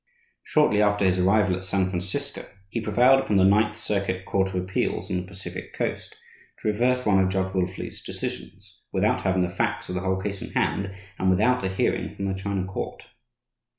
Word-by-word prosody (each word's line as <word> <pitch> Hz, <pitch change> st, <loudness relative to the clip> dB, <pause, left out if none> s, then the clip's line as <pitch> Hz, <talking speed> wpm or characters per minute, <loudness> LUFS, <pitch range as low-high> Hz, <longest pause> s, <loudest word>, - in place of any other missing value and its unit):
Shortly 130 Hz, -9 st, +3 dB
after 105 Hz, -1 st, +3 dB
his 95 Hz, 0 st, +3 dB
arrival 95 Hz, 0 st, +3 dB
at 95 Hz, -, -6 dB
San 95 Hz, 0 st, +1 dB
Francisco, 100 Hz, +11 st, -2 dB, 0.2 s
he 115 Hz, -, -3 dB
prevailed 120 Hz, +5 st, +5 dB
upon 135 Hz, -6 st, -1 dB
the 95 Hz, -, +5 dB
Ninth 105 Hz, +2 st, +4 dB
Circuit 100 Hz, -4 st, -2 dB
Court 95 Hz, -1 st, +1 dB
of 95 Hz, -, -7 dB
Appeals, 90 Hz, +1 st, -1 dB
on 90 Hz, -, +1 dB
the -, -, -1 dB
Pacific 95 Hz, 0 st, -8 dB
Coast, -, -, -3 dB, 0.4 s
to -, -, -4 dB
reverse 125 Hz, +4 st, +2 dB
one 100 Hz, -3 st, +4 dB
of 95 Hz, -, +1 dB
Judge 95 Hz, 0 st, -1 dB
Wilfley's 95 Hz, 0 st, -3 dB
decisions 65 Hz, 0 st, -7 dB
without -, -, +1 dB
having 95 Hz, -1 st, +1 dB
the 90 Hz, -, -1 dB
facts -, -, -1 dB
of -, -, -3 dB
the 90 Hz, -, -2 dB
whole 95 Hz, 0 st, 0 dB
case 100 Hz, 0 st, -4 dB
in -, -, -8 dB
hand 95 Hz, -1 st, 0 dB, 0.3 s
and 95 Hz, -, +2 dB
without 110 Hz, +7 st, +3 dB
a 95 Hz, -, 0 dB
hearing 95 Hz, -, -1 dB
from 100 Hz, -, -4 dB
the 95 Hz, -, 0 dB
China 95 Hz, 0 st, -2 dB
court. 95 Hz, -, -6 dB
95 Hz, 195 wpm, -25 LUFS, 95-105 Hz, 0.4 s, prevailed